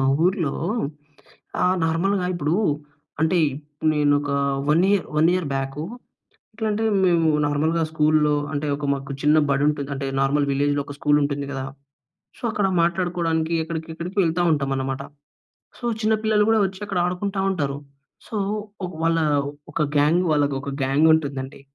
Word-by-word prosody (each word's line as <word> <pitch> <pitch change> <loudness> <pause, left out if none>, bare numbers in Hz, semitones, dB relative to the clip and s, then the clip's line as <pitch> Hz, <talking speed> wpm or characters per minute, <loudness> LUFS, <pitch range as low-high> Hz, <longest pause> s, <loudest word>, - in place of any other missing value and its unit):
మా 135 - +2 0.2
ఊర్లో 180 -6 +1 1.1
ఆ! - - +4 0.2
నార్మల్‌గా 180 +4 +1
ఇప్పుడు 155 -1 -1 0.7
అంటే, 170 +2 +3 0.5
నేను 145 -1 +3
ఒక 145 - -5 0.4
వన్ 165 +4 +4
ఇయర్ 200 -2 +2
1 160 +2 +5
ఇయర్ 180 -4 -1
బ్యాకు, 135 +2 -3 0.7
ఎట్లా 220 0 -2
అంటే 215 +2 -1 0.2
మేము 170 -3 +3 0.2
నార్మల్‌గా 155 +3 +1
స్కూల్‌లో 155 -1 +3 0.2
అంటే 145 +1 -2
ఒక 145 - -4
మాకు 140 0 -6
చిన్న 150 +1 +5
బడి 140 +1 +2
ఉంటది. 145 -2 -2
అంటే 135 0 -4
నార్మల్ 140 +1 +2
విలేజ్‌లో 145 +1 +1
ఒక 145 - -7
స్కూల్ 145 0 +3
ఉంటుంది 140 0 -2
కదా! 135 -1 -4 0.7
సో, - - -19
అక్కడ 205 -2 +1 0.2
మాట్లాడుకోవడానికి 170 -2 0
ఎక్కడికి 160 0 -5
ఎక్కడికి 175 +4 -7
వెళ్తా 170 +1 +1
ఉంటాం 140 -2 0
అన్నమాట. 135 0 -3 0.8
సో, - - -12 0.2
చిన్న 220 0 +2
పిల్లలు 210 -1 +3
కూడా 225 - +4
వచ్చి 190 +1 -9
అక్కడ 195 -3 -2
ఆడుకుంటా 190 +2 -2
ఉంటారు. 140 -6 -2 0.5
సో, 220 - -5 0.5
ఒక 180 - -8
వాళ్ళ 165 0 +2 0.5
ఒక 165 - 0 0.2
గ్యాంగ్ 155 +5 +3
వాళ్ళకి 145 -2 +1
ఒక 140 - -4
గ్యాంగ్ 135 +4 +3
ఉంటుందండి. 140 -3 -3
155 Hz, 155 wpm, -23 LUFS, 145-180 Hz, 1.1 s, 1